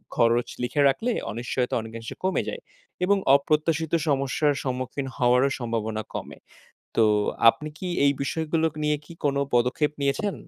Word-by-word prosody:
খরচ 120 +1 +3 0.2
লিখে 145 +4 0
রাখলে 225 - 0 0.2
অনিশ্চয়ত 125 +2 -2
অনেকাংশে 115 0 -8
কমে 190 - +1
যায়। 485 - -6 0.4
এবং 200 +1 +3 0.2
অপ্রত্যাশিত 155 +2 0
সমস্যার 140 +1 +1
সম্মুখীন 130 +1 -3
হওয়ারও 125 +1 +4
সম্ভাবনা 110 -2 -2
কমে। - - -6 0.6
তো 115 - +5 0.4
আপনি 150 +7 +1
কি 185 - -4 0.2
এই 140 - +5
বিষয়গুলোক 160 +2 0
নিয়ে 150 0 +2
কি 170 - -12
কোন 140 -1 +1 0.2
পদক্ষেপ 125 +5 +2
নিয়েছেন? 140 +9 0
140 Hz, 135 wpm, -25 LUFS, 120-155 Hz, 0.6 s, তো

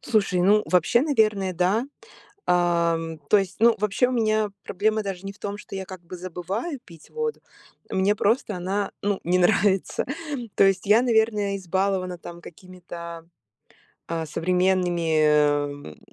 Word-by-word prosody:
Слушай, 200 -6 +1
ну, 210 +3 +4
вообще, 185 +7 +3
наверное, 215 -10 +1
да, 185 +7 +1 0.6
а. 170 -1 +2 0.3
То 210 - +6
есть, 195 -2 -2
ну, 230 +1 +5
вообще, 210 +4 +1
у 255 - -3
меня 215 -3 +1
проблема 215 +3 0
даже 195 -1 -5
не 195 - -5
в 200 - -23
том, 205 0 -4
что 205 - -10
я, 190 0 -4
как 185 -1 -10
бы, 175 +1 -9
забываю 185 - -5
пить 165 -4 -16
воду. 460 -1 -3 0.5
Мне 195 +2 +2
просто 210 0 0
она, 195 +3 -2
ну, 205 -1 0
не 180 +2 +2
нравится. 195 +1 +2 0.5
То - - +5
есть 195 -1 +1
я, 215 +3 +6
наверное, 220 -4 +1
избалована 190 0 -1
там 170 0 -10
какими-то, 170 -1 -10 0.8
а, 165 -1 -3
современными, 155 - +1
190 Hz, 145 wpm, -24 LUFS, 175-210 Hz, 0.8 s, То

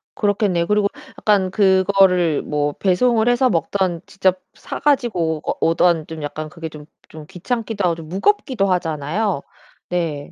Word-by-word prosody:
그렇겠네요. 200 -5 +1
그리고 210 0 +2 0.3
약간 200 -3 +2
그거를 190 -4 +3
뭐 145 -1 -1
배송을 220 +6 +2
해서 245 +1 +3
먹든 175 -1 -1
직접 190 -1 0
사 - - -7
가지고 195 - +1
오 - - 0
어 - - -6
오든 165 -1 +2
좀 160 -1 -7
약간 155 +1 -5
그게 165 0 -7
좀 150 -1 -11 0.2
좀 155 -1 -11
귀찮기도 220 +2 -3
하고 175 - +2
좀 160 -2 -10
무겁기도 225 - +1
하잖아요? 165 +2 -2 0.5
네. 165 -5 -3
180 Hz, 315 characters per minute, -20 LUFS, 160-205 Hz, 0.5 s, 그거를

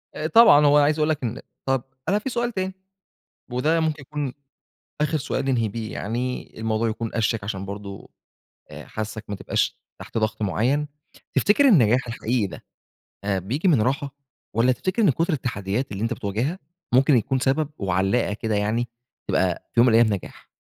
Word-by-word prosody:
أآ، 155 +1 -2
طبعًا 160 -9 +7
هو 145 +1 +6
أنا 145 - +5
عايز 155 +1 +1
اقول 155 +1 +2
لك 150 -4 -1
إن 120 +2 -3 0.3
طب، 135 -2 +1 0.3
أنا 205 +2 +3
في 265 - -4
سؤال 240 -1 -1
تاني، 190 -2 -3 0.8
وده 155 +7 +2
ممكن 155 -2 -1
يكون 145 -2 -4 0.7
آخر 150 +1 +1
سؤال 135 0 -2
ننهي 120 -5 +1
بيه 110 +1 -5
يعني، 125 +4 -4
الموضوع 110 +1 0
يكون 115 0 -4
أشيك 110 -2 0
عشان 100 -2 -4
برضه 100 0 -8 0.6
آآ، - - -9
حاسّك 110 0 -5
ما 100 - -3
تبقاش - - -1 0.2
تحت - - -5
ضغط 110 0 -1
معيّن. 125 +9 +1 0.5
تفتكر 275 +8 +4
النجاح 125 - +4
الحقيقي 115 -1 -1
ده، 95 - -10 0.6
آآ، 100 -1 0
بييجي 130 - -2
من 150 -11 +4
راحة؟ 135 +3 -1 0.4
والّا 115 +3 +3
تفتكر 185 - -1
إن 200 - +5
كُتر 165 +5 +1
التحديات 120 -3 -2
اللي 100 +1 -4
أنت 115 +1 0
بتواجهها 115 - -2 0.3
ممكن 135 +2 +5
يكون 130 +3 0
سبب 140 +3 +1
وعلّاقة 95 +4 +1
كده 110 +1 -2
يعني، 110 +4 0 0.4
تبقى 95 -2 0
في - - +1
يوم 120 - +7
من 115 - +4
الأيام 115 -2 +5
نجاح؟ 100 - -8
125 Hz, 180 wpm, -24 LUFS, 110-150 Hz, 0.8 s, طبعًا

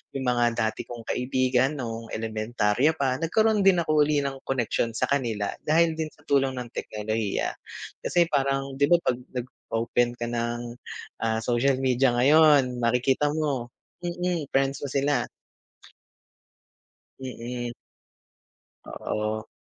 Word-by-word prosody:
'yung 135 - -2
mga 120 -1 +2
dati 110 -2 -1
kong 120 -1 -8
kaibigan 130 +2 +1
nung 115 -3 -5
elementarya 110 +5 +1
pa, 135 -4 0
nagkaroon 215 +6 +2
din 190 -3 +4
ako 155 -1 +3
uli 145 -2 +1
ng 135 -1 -3
koneksyon 120 -2 0
sa - - -1
kanila 115 -7 0 0.2
dahil 165 +1 +4
din 160 - -1
sa 150 - -24
tulong 135 -2 +2
ng 125 -1 -5
teknolohiya 105 - -2 0.5
kasi 175 -1 +3
parang. 135 -1 0
'di 140 - +4
ba, - - +9
pag 125 - +1 0.2
nag-open 120 -1 -1
ka 120 - -4
ng, 120 0 -3 0.5
ah, 110 0 +1
social 125 +3 +2
media 130 0 +3
ngayon, 140 -1 +5
makikita 125 +4 +2
mo 140 -6 -1 0.4
hmm, 175 - -2
hmm 180 -1 0
friends 135 0 +1
mo 145 - -2
sila. 140 +1 +1 2.0
Mm. 120 -1 -5 1.1
Oo. 110 +1 -3
125 Hz, 130 wpm, -26 LUFS, 120-140 Hz, 2.0 s, ba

